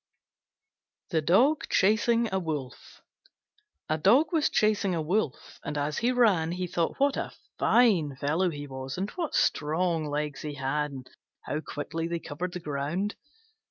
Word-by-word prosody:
THE 160 -3 +2
DOG 250 - +3
CHASING 230 +3 +3
A 190 - +2
WOLF 150 -7 -6 0.8
A 155 +1 0
Dog 260 - +4
was 315 -3 +3
chasing 205 -3 +2
a 165 - -1
Wolf, 165 -4 -2
and 150 - -4
as 145 +1 -1
he 240 +2 +2
ran 195 -10 +3
he 180 0 -2
thought 175 +3 -2
what 280 0 +3
a - - -3 0.3
fine 180 - +3
fellow 155 +7 +1
he 145 -3 -6
was, 130 -1 -6
and 195 +3 -2
what 335 -4 -3
strong 160 +1 +1
legs 150 -1 -3
he 150 -1 -5
had, 145 +2 -1
and 130 -2 -9 0.3
how 150 - -2
quickly 165 +2 -4
they 170 0 -2
covered 175 +3 -5
the 180 - -4
ground. 155 +7 -2
165 Hz, 160 wpm, -28 LUFS, 150-205 Hz, 0.8 s, Dog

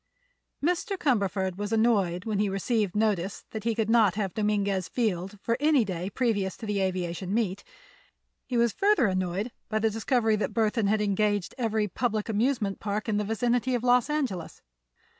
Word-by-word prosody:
Mr. 360 +3 0
Cumberford 195 - 0
was 205 +1 -4
annoyed 205 -6 +2
when 215 -3 -1
he 205 -1 +2
received 200 +1 -1
notice 205 -3 0
that 220 0 -6
he 230 -1 +1
could 220 -1 0
not 225 -5 +4
have 200 -4 -2
Dominguez 200 -3 0
Field 205 -4 -2
for 230 0 0
any 290 -5 +4
day 185 -1 -3
previous 205 -5 -1
to 225 - -7
the 205 -2 -1
aviation 185 -1 -2
meet. 205 -3 -1 0.8
He 250 - -1
was 235 -1 +3
further 410 - +3
annoyed 185 +3 -1 0.2
by 215 - 0
the 220 0 +1
discovery 225 0 +1
that 210 - -3
Burthon 220 -1 +1
had 215 +1 +2
engaged 205 -1 0
every 220 -3 0
public 220 +1 -2
amusement 220 -2 0
park 210 +2 -3
in 215 -2 +1
the 210 - 0
vicinity 240 +4 0
of 240 - -2
Los 250 +2 +3
Angeles. 265 - -3
215 Hz, 175 wpm, -27 LUFS, 195-235 Hz, 0.8 s, not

